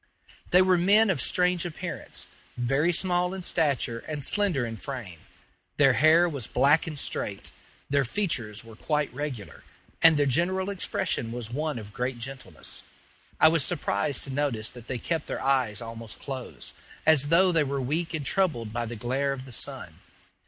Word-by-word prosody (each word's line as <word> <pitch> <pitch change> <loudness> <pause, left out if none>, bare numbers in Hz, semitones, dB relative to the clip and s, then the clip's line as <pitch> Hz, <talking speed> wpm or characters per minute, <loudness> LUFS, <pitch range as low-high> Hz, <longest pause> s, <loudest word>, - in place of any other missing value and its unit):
They 180 +1 +6
were 185 -1 +3
men 205 +4 +5
of 140 - 0
strange 180 +3 +2
appearance 170 -3 -5 0.3
very 135 +7 +1
small 180 +1 +1
in 190 - -6
stature 140 -9 0
and 150 -3 0
slender 185 -12 +2
in 115 -1 -6
frame. 115 - -7 0.6
Their 135 -3 +5
hair 155 +7 +5
was 140 -9 -4
black 145 +6 +3
and 155 -2 -5
straight, - - -4 0.4
their 140 0 +2
features 120 - -1
were 115 -1 -13
quite 150 +4 -1
regular, 130 -7 -6 0.4
and 160 -1 +7
their 145 - +3
general 185 +8 0
expression 150 -10 -2
was 120 -1 -6
one 150 +1 -2
of 105 -2 -9
great 125 +1 -2
gentleness. 130 +2 -5 0.6
I 160 - +7
was 160 -3 +2
surprised 150 -4 -1
to 135 - -4
notice 130 -6 -1
that 120 -2 -13
they 130 - -3
kept 160 +6 -3
their - - -3
eyes 125 -5 +1
almost 115 -1 -8
closed, 130 -3 -7 0.3
as 150 -3 +6
though 180 +4 +5
they 165 -3 +3
were 140 0 -2
weak 160 +6 -2
and 150 -3 -4
troubled 130 - 0
by 120 0 -2
the 120 - -6
glare 130 +5 -1
of 130 -1 -8
the 130 - -11
sun. - - -2
140 Hz, 175 wpm, -27 LUFS, 120-165 Hz, 0.6 s, and